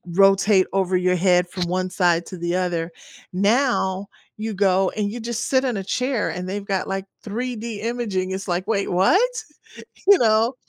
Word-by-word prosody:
rotate 195 0 +5
over 190 -1 +1
your 180 0 +2
head 180 0 +3
from 180 -1 -3
1 185 0 -1
side 175 -2 +2
to 185 - -8
the 175 +1 -2
other. 175 -2 -1 0.4
Now, 200 -2 +1 0.3
you 220 +1 -4
go 190 -1 +2
and 205 -1 -1
you 240 - -6
just 235 +1 -3
sit 260 0 +2
in 245 -5 -1
a 195 - -3
chair 250 +2 -1
and 180 0 -5
they've 200 +1 -4
got, 195 -2 -2
like, 195 0 -3 0.2
3D 230 -1 -4
imaging, 215 -6 -2
it's 190 +1 -4
like, 180 +1 -1
"Wait, 200 -3 0
what?" 190 - +4 0.9
You 400 -1 +7
know? 225 +2 +3
195 Hz, 180 wpm, -22 LUFS, 185-225 Hz, 0.9 s, You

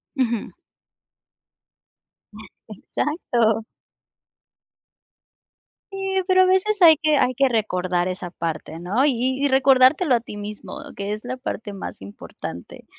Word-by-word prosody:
Ujú. 235 -5 -1 2.2
Exacto. 225 - -1 2.3
Sí, 390 - -7 0.3
pero 370 -1 +5
a - - +4
veces 380 +1 +2
hay 320 -3 +8
que 310 -2 +2
hay 255 - +2
que 270 +1 +2
recordar 185 -5 0
esa 185 -1 -5
parte, 165 -1 -5
¿no? 205 +11 +1
Y 260 +1 0
y - - +4
recordártelo 265 +3 +4
a 235 - +1
ti 215 -3 -10
mismo, 205 0 -8 0.2
que 200 +1 -3
es 215 - -6
la 255 +1 -4
parte 220 -5 -5
más 195 - -7
importante, 85 -3 -9
240 Hz, 120 wpm, -22 LUFS, 200-280 Hz, 2.3 s, hay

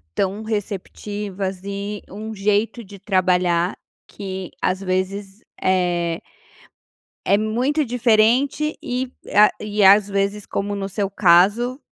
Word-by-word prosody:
tão 195 +2 -1
receptivas 205 -2 -4
e, 200 +1 -5
um 215 +3 -7
jeito 210 +3 0
de 200 0 -12
trabalhar 180 -3 +1 0.3
que 190 -2 -6
às 185 +1 0
vezes 195 +2 -3 0.2
eh 175 -3 +1 1.1
é 200 - +4
muito 245 +8 0
diferente 245 +5 +2
e 250 +1 -3 0.2
a 210 +1 +7
e 210 -1 0
às 200 +1 +7
vezes 200 +1 -1
como 205 +1 -3
no 195 -1 -3
seu 195 0 -2
caso, 205 +8 +3
200 Hz, 115 wpm, -21 LUFS, 190-215 Hz, 1.1 s, a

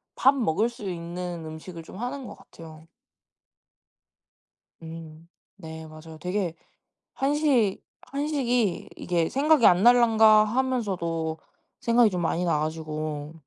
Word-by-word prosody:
밥 270 +2 +4
먹을 225 - +1
수 215 -5 -7
있는 175 0 -5
음식을 160 +2 -9
좀 175 - -12
하는 255 +4 -5
것 - - -9
같아요. 160 -1 -14 1.9
음. 160 0 -10 0.3
네. 160 -3 -9
맞아요. 155 +1 -12
되게 180 0 -2 0.6
한식, 270 -7 +1 0.2
한식이 260 - -1
이게 170 -2 -1
'생각이 285 -2 +3
안 180 +2 +6
날란가.' 225 -3 +6
하면서도 195 -10 -1 0.4
생각이 235 -1 +4
좀 180 -3 -3
많이 170 +1 0
나 165 -3 +1
가지고 155 -1 -4
180 Hz, 225 characters per minute, -26 LUFS, 160-240 Hz, 1.9 s, 안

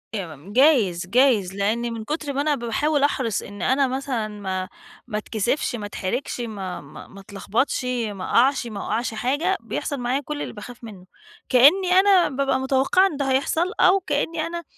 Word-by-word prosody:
إمم 175 0 -7
جايز، 225 - +3
جايز 225 -5 +3
لأن 230 +4 -1
من 225 -1 -6
كتْر 295 +1 -4
ما 280 - 0
أنا 300 -1 +1
باحاول 280 +5 0
أحرِص 255 -7 0
إن 205 -1 -10
أنا 265 +4 +2
مثلًا 255 -4 -2
ما 190 -3 -4 0.4
ما 210 -3 -3
اتكسِفش، 235 +5 -1
ما 210 -3 -5
اتحرِجْش 240 +6 -4
ما 195 -7 -5
ما 145 +1 -12
ما 195 - -14
اتلخبطْش، 210 +7 -2 0.2
ما 195 -2 -7
أقعْش، 255 0 +2
ما 210 -3 -6
أوقّعش 230 +2 -2
حاجة، 290 +12 0
بيحصل 285 -4 -4
معايا 250 +3 -1
كلّ 295 +1 -5
اللي - - -5
باخاف 240 +3 -11
منّه، 195 -5 -10 0.4
كإنّي 320 +9 +5
أنا 385 -4 +5
بابقى 270 -1 0
متوقّعة 270 +8 +3
إن 300 - -6
ده 270 -2 -1
هيحصل، 320 +7 +1
أو 380 +1 +5
كإني 320 0 -2
أنا 340 0 -5
250 Hz, 175 wpm, -23 LUFS, 210-285 Hz, 0.4 s, كإنّي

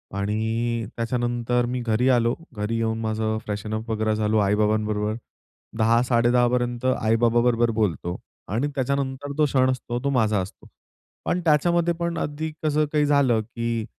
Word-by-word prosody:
आणि 110 +3 -1
त्याच्यानंतर 120 0 0
मी 125 +1 -2
घरी 115 +1 +1
आलो. 120 -2 +3 0.2
घरी 105 +2 -2
येऊन 110 0 -1
माझं 110 0 -1
फ्रेशन 105 +1 -4
अप 110 +2 -4
वगैरे 110 0 0
झालो. 105 0 +1
आई-बाबांबरोबर 105 +1 +1 0.6
10.00 115 +1 +4
10.30 120 0 +3
पर्यंत 120 0 -1
आई-बाबांबरोबर 120 0 +2
बोलतो 90 -4 -1 0.3
आणि 115 +8 -1
त्याच्यानंतर 140 +1 -2
तो 155 - +4
क्षण 130 -2 +2
असतो, 120 -1 -3
तो 140 - +1
माझा 110 -6 +2
असतो. 95 - -10 0.6
पण 175 - 0
त्याच्यामध्ये 170 +2 +3
पण 170 -1 -2
अगदी 155 +2 -3
कसं 155 0 +2
काही 150 -1 +2
झालं 140 -6 +3
की 115 0 -3
120 Hz, 145 wpm, -24 LUFS, 110-130 Hz, 0.6 s, 10.00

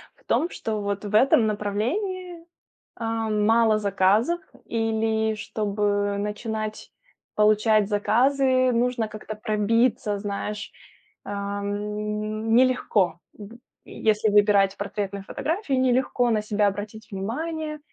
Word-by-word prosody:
в - - -28
том, 340 - +1
что 215 -2 -4
вот 200 0 -3
в 205 - -6
этом 240 -1 +5
направлении, 330 - -3 0.5
а, 225 -1 -2
мало 215 +1 +3
заказов 205 - +2 0.2
или 220 -1 0
чтобы 205 -1 -1
начинать 215 +1 -4 0.4
получать 215 0 +3
заказы, 255 +4 +2
нужно 235 -1 0
как-то 215 0 -7
пробиться, 215 0 +1
знаешь, 205 +1 -4 0.5
ам, 210 +2 -3
нелегко 230 -9 +2
в 220 +3 -12 0.3
Если 215 0 +1
выбирать 205 -1 +4
портретные 200 -1 -4
фотографии, 320 - -2
нелегко 255 -1 +2
на 215 -2 +1
себя 210 0 +1
обратить 210 +2 -4
внимание, 305 +10 -4
215 Hz, 105 wpm, -24 LUFS, 205-235 Hz, 0.5 s, этом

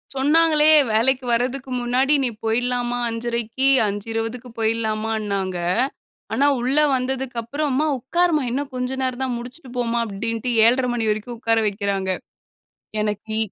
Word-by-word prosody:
சொன்னாங்களே 305 +2 +4 0.2
வேலைக்கு 255 +4 +2
வர்றதுக்கு 255 +3 -1
முன்னாடி 255 +4 +2
நீ 250 - +1
போயிர்லாமா 245 +2 0
5:30க்கி, 235 +2 -1 0.2
5:20க்கு 225 +4 -4
போய்ரலாமான்னாங்க. 215 -4 -1 0.8
ஆனா 280 - +3 0.2
உள்ள 260 +4 0 0.2
வந்ததுக்கு 255 -1 -2
அப்புறம் 285 +5 -2
அம்மா 300 +4 +1
உக்காரும்மா, 330 +3 +1
இன்னும் 275 +1 -3
கொஞ்சம் 255 +1 -2
நேரம் 255 0 -2
தான் 250 -2 -1
முடிச்சிட்டு 250 +2 -10
போம்மா 235 -1 0
அப்டின்டு 230 +4 -3
7:30 240 -2 +2
வரைக்கும் 220 +3 -4
உட்கார 225 -1 +2
வைக்கிறாங்க. 195 -2 -2 0.9
எனக்கி 210 +1 -3
240 Hz, 120 wpm, -22 LUFS, 225-265 Hz, 0.9 s, சொன்னாங்களே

